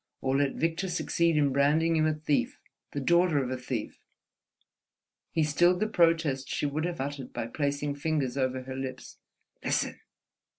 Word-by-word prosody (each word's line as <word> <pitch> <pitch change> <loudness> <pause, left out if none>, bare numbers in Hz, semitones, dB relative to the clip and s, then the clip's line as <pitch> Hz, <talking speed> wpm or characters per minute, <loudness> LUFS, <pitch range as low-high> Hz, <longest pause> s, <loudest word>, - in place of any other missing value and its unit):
or 130 0 0
let 140 0 +1
Victor 165 +3 -1
succeed 170 -2 +1
in 145 -2 +3
branding 155 +4 +3
you 155 0 +3
a 155 - +2
thief, 150 -1 -1 0.3
the 145 - -3
daughter 170 +2 +3
of 130 - -4
a - - 0
thief!" 125 -3 -5 1.3
He 160 - +1
stilled 175 +4 +3
the 215 - +2
protest 165 -8 +2
she - - -1
would 150 +3 -1
have 175 -1 -3
uttered 140 -1 -4
by - - -3
placing 145 +3 -2
fingers 145 -3 -1
over 130 -1 -1
her 130 0 -6
lips. 135 0 -6 0.4
"Listen!" - - 0
145 Hz, 165 wpm, -29 LUFS, 135-165 Hz, 1.3 s, in